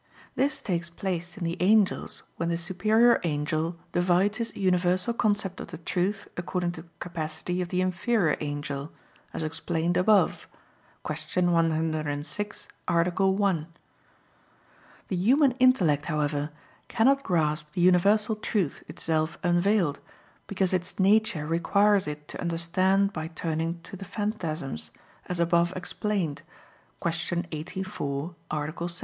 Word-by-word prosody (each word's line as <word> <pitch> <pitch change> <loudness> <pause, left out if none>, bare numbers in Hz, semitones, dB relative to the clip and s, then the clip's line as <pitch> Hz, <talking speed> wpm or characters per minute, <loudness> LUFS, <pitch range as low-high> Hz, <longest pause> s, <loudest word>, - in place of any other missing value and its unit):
This 280 +2 0
takes 170 -3 -2
place 175 +1 -4
in 190 - -5
the 170 +1 -2
angels 205 +1 +2
when 170 0 -1
the 170 - 0
superior 215 +7 +3
angel 155 +1 -1 0.2
divides 180 +4 +2
his 230 0 -3
universal 180 +2 +2
concept 205 -4 0
of - - -6
the 170 -1 -8
truth 185 +4 -1
according 175 0 -2
to 160 - -8
the 170 - -18
capacity 170 +1 -3
of 175 - -3
the 180 0 0
inferior 185 -1 +1
angel, 145 0 -4 0.4
as - - -4
explained 165 +2 -1
above 190 -1 +3 0.6
(Q. 155 +4 -1
106, 160 +3 -1 0.2
A. 170 +1 +3 0.2
1). 190 -5 +1 1.4
The 190 - -1
human 260 - +4
intellect, 180 - +4
however, 150 -2 -1 0.4
cannot 265 +4 +3
grasp 155 - 0
the 175 - -1
universal 200 +5 +4
truth 210 -7 -1
itself 160 0 -1
unveiled; 175 -3 +2 0.5
because 190 -2 +1
its 180 -1 -1
nature 195 -5 +3
requires 195 +4 +3
it 150 0 -6
to - - -6
understand 185 +4 +2
by 155 0 -4
turning 165 +1 -2
to 195 - -10
the 195 - -8
phantasms, 160 - -3 0.4
as 180 -1 -3
above 170 0 +3
explained 185 -4 -2 0.6
(Q. 170 +1 -1
84, 165 -2 -4
A. 150 -1 -1 0.2
7). - - -4
175 Hz, 130 wpm, -27 LUFS, 160-195 Hz, 1.4 s, human